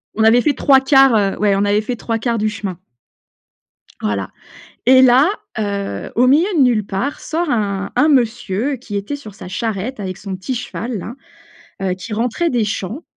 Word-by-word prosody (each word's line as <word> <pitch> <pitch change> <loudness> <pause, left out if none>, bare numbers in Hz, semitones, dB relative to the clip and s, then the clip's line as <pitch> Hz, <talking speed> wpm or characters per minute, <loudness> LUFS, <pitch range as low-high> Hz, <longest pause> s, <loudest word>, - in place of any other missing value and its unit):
On 220 - +1
avait 230 +2 +5
fait 290 +3 +2
3/4, 270 -2 +5
heu, 200 -2 +1
ouais 205 -2 +3
on 200 - +1
avait 205 +1 +2
fait 245 +3 -4
3/4 230 +1 -2
du 215 0 0
chemin 200 -4 -5 1.2
voilà 100 -3 -2 0.5
et 260 +1 +7
là, 260 +5 +6 0.3
heu, 200 - -3
au 250 +2 +4
milieu 305 +7 +4
de - - +4
nulle 235 -5 +3
part, 210 +9 -3
sort 335 +1 -2
un 200 -5 -1
un 300 - +4
monsieur 240 -1 +1
qui 225 -4 -8
était 200 +8 -3
sur 215 -8 -12
sa 185 - -10
charrette, 220 +5 -3
avec 185 -2 -4
son 195 -2 -6
petit 190 +8 -4
cheval-là, 235 -1 -5 0.7
heu, 190 -1 0
qui 210 +4 -8
rentrait 245 +10 0
des 240 -5 +1
champs 215 - -4
225 Hz, 180 wpm, -18 LUFS, 200-260 Hz, 1.2 s, et